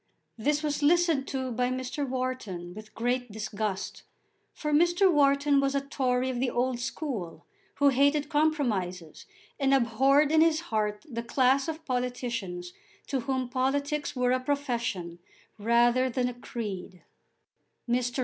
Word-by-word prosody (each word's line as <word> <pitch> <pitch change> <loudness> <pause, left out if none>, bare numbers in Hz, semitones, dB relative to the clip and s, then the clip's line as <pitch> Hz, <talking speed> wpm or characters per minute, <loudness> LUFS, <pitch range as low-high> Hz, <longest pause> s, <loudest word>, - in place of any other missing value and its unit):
This 295 +7 0
was 295 -1 -1
listened 325 -2 +3
to 260 -2 -3
by 245 +1 0
Mr. 260 +2 -3
Wharton 250 -9 -4
with 215 +2 -12
great 245 0 -1
disgust, 210 -2 -4 0.5
for 300 -1 -3
Mr. 345 +4 +4
Wharton 280 0 +4
was 275 0 +1
a 280 - +2
Tory 260 -2 0
of 245 - -4
the 255 0 +1
old 245 0 0
school, 240 - -5 0.3
who 285 0 +4
hated 285 +2 +2
compromises, 235 - -1 0.3
and 275 -1 +4
abhorred 270 +4 +3
in 315 0 +5
his 320 -1 +4
heart 210 +2 -1
the 235 -5 -4
class 260 +4 +2
of 320 0 -5
politicians 240 - -3 0.3
to 270 - -1
whom 260 0 -2
politics 280 +3 -1
were 250 -1 +2
a 255 - +2
profession 235 -11 -2 0.4
rather 240 +4 +3
than 250 0 0
a 250 - -3
creed. 205 -7 -6 0.8
Mr. 245 +1 0
255 Hz, 140 wpm, -28 LUFS, 235-285 Hz, 0.8 s, in